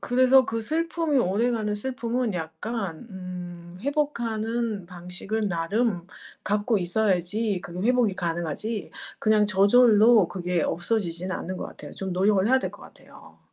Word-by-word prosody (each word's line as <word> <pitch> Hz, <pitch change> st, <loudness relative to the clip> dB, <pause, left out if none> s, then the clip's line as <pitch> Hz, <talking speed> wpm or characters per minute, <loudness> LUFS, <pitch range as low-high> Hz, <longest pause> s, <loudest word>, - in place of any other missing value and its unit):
그래서 255 Hz, +1 st, +5 dB
그 225 Hz, 0 st, -2 dB
슬픔이 320 Hz, +2 st, 0 dB
오래가는 215 Hz, +1 st, +1 dB
슬픔은 245 Hz, 0 st, -2 dB
약간 175 Hz, +4 st, -5 dB
음 180 Hz, -2 st, -8 dB
회복하는 235 Hz, -, -2 dB
방식은 180 Hz, +4 st, -4 dB
나름 175 Hz, +2 st, -1 dB, 0.4 s
갖고 210 Hz, +1 st, +1 dB
있어야지 190 Hz, +1 st, +1 dB
그게 180 Hz, +6 st, -3 dB
회복이 245 Hz, -6 st, +3 dB
가능하지 175 Hz, +6 st, -3 dB, 0.3 s
그냥 215 Hz, -1 st, +3 dB
저절로 210 Hz, 0 st, +5 dB
그게 180 Hz, -2 st, -1 dB
없어지지는 180 Hz, -1 st, -1 dB
않는 185 Hz, +1 st, -5 dB
것 -, -, -5 dB
같아요. -, -, -11 dB
좀 190 Hz, -1 st, -4 dB
노력을 190 Hz, +2 st, +2 dB
해야 260 Hz, +3 st, +4 dB
될 -, -, -3 dB
것 -, -, -14 dB
같아요. -, -, -16 dB
210 Hz, 310 characters per minute, -25 LUFS, 180-235 Hz, 0.4 s, 그래서